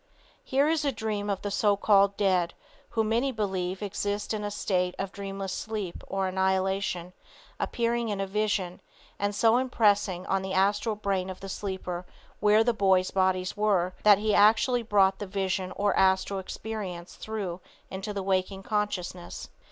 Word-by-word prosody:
Here 275 +2 +2
is 315 -1 +1
a 280 - +1
dream 210 -3 -3
of 195 -2 -2
the 205 - -2
so 205 0 +2
called 200 -1 +4
dead 185 -4 +1 0.3
who, 225 - 0
many 230 +5 +1
believe, 190 -4 -2
exist 205 +1 -2
in 210 -1 -3
a 205 - -2
state 180 -3 -1
of 195 - -3
dreamless 195 -1 -5
sleep 210 -5 -4
or 195 -1 -1
annihilation, 190 -1 0 0.5
appearing 235 -1 0
in 205 -2 -2
a 195 - 0
vision, 195 -3 -1 0.4
and 205 0 -1
so 225 +2 +4
impressing 205 -7 +2
on 195 0 0
the 190 0 -4
astral 205 +3 +2
brain 195 -3 -1
of 185 - -7
the 195 - -8
sleeper 190 -3 -4 0.4
where 210 +1 +5
the 240 +1 +2
boy's 190 -3 +3
bodies 185 -1 +1
were, 195 -4 +1
that 210 -2 +7
he 210 +1 0
actually 225 +4 +4
brought 195 -4 +3
the 205 - -5
vision 190 -1 -2
or 205 -1 +1
astral 190 +1 +2
experience 190 -3 -6
through 195 -5 -5 0.3
into 195 +3 -4
the 200 -2 -3
waking 190 0 -1
consciousness. 200 -5 -3
200 Hz, 165 wpm, -28 LUFS, 190-210 Hz, 0.5 s, that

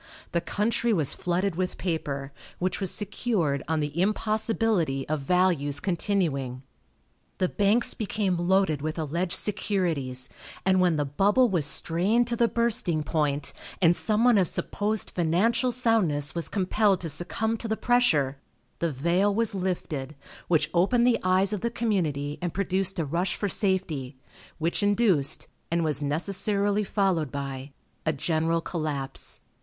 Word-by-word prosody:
The 170 - 0
country 230 +6 0
was 155 -8 +2
flooded 180 +1 -1
with 180 +1 -2
paper, 140 -6 -3 0.2
which 185 +2 -2
was 190 - +2
secured 195 - -1
on 160 0 0
the 150 +3 -2
impossibility 215 - 0
of 155 0 -1
values 150 -2 +1
continuing. 160 -9 -1 0.7
The 185 - +1
banks 205 +6 +2
became 205 -3 -1
loaded 175 -3 +2
with 155 +2 -3
alleged 170 +3 -1
securities, 165 -12 0 0.4
and 190 -1 +4
when 175 -3 +3
the 145 -1 0
bubble 205 - +3
was 170 -7 +1
strained 190 +12 +2
to 240 - 0
the 235 0 +3
bursting 215 -10 0
point, 150 -2 0 0.3
and 175 -2 +5
some 215 +4 0
one 240 -4 +5
of 185 - +3
supposed 210 +5 -2
financial 190 +9 +1
soundness 215 - +1
was 170 -1 -2
compelled 200 0 +2
to 170 - -3
succumb 180 +8 -1
to 230 - -5
the 220 0 -1
pressure, 155 - +2 0.4
the 170 -1 0
veil 170 +9 +1
was 225 +1 0
lifted, 165 -7 -3 0.3
which 160 -3 +2
opened 220 +8 +3
the 245 -2 +3
eyes 185 +2 +2
of 210 - -3
the 235 - 0
community 165 -12 -1
and 175 -2 -3
produced 195 0 0
a 165 - 0
rush 170 +6 -1
for 205 - -2
safety, 175 - -1 0.4
which 165 +6 -1
induced, 205 -8 +2 0.2
and 170 0 +1
was 150 -3 -1
necessarily 200 +7 +1
followed, 190 -7 0
by 140 -1 -5 0.3
a 155 - +1
general 160 +2 0
collapse. 150 -6 -3
180 Hz, 150 wpm, -26 LUFS, 155-205 Hz, 0.7 s, and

